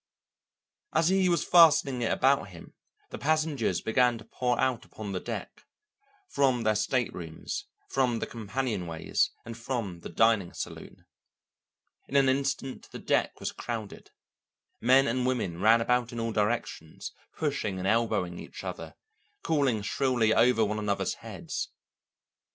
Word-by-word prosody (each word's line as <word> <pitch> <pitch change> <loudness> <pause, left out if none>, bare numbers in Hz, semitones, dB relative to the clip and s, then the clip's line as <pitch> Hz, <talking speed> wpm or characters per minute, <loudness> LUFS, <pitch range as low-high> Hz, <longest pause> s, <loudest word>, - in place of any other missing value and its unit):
As 165 +1 +4
he 190 -1 +3
was 170 - +2
fastening 150 -7 +5
it 115 - 0
about 135 -5 +2
him, 85 -2 -13 0.4
the - - -6
passengers 155 -4 0
began 120 +1 +2
to 110 - -12
pour 125 -1 -1
out 130 -3 +1
upon 105 -2 -8
the 95 - -2
deck, - - -6 0.7
from 130 - +2
their 110 -1 +3
staterooms, 105 -7 -2 0.2
from 125 -3 +1
the - - -2
companionways, 105 -8 -2 0.2
and 115 0 -7
from 115 -7 -4
the - - -8
dining 110 -6 +2
saloon. - - -8 1.0
In 140 - -7
an 135 -1 +5
instant 135 -1 -2
the - - -8
deck - - 0
was - - -3
crowded. 110 -4 -6 0.7
Men 130 +3 +5
and 125 +1 0
women 95 -9 -2
ran 115 +2 +5
about 125 +1 +1
in 120 - -5
all 115 0 -1
directions, 105 -7 -2 0.3
pushing 140 -11 -1
and 95 +1 -2
elbowing 105 -6 +1
each - - -9
other, - - -6 0.5
calling 135 -9 +1
shrilly 120 -1 +2
over 115 -2 +4
one 105 +1 -2
another's 100 -1 -1
heads. - - -5
120 Hz, 140 wpm, -28 LUFS, 105-135 Hz, 1.0 s, fastening